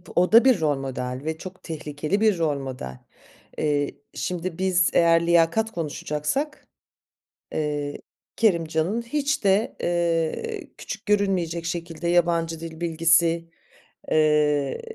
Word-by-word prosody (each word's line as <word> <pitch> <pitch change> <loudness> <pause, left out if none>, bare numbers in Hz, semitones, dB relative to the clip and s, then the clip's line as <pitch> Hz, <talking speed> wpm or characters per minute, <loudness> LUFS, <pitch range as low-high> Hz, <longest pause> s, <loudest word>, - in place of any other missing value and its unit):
O 180 +3 +3
da 230 +3 +7
bir 250 -9 +5
rol 145 -3 +2
model 130 -1 -4
ve 160 0 -2
çok 185 +2 -10
tehlikeli 155 +4 -3
bir 215 -5 +4
rol 150 -4 0
model. 125 - -7 0.6
Eee, 145 -2 0 0.2
şimdi 180 -1 -3
biz 185 -1 +2
eğer 170 0 +4
liyakat 170 +7 +3
konuşacaksak, 165 - -3 0.9
eee, 145 -1 -2 0.4
Kerimcan'ın 170 0 +1
hiç 285 +2 -1
de, 195 +3 +2
eee, 175 - -1
küçük 205 +1 -7
görünmeyecek 185 -5 0
şekilde 170 -1 -4
yabancı 170 -2 +1
dil 165 -1 -8
bilgisi, 165 0 +2 0.6
eee, 150 -2 +2
170 Hz, 115 wpm, -24 LUFS, 155-190 Hz, 0.9 s, da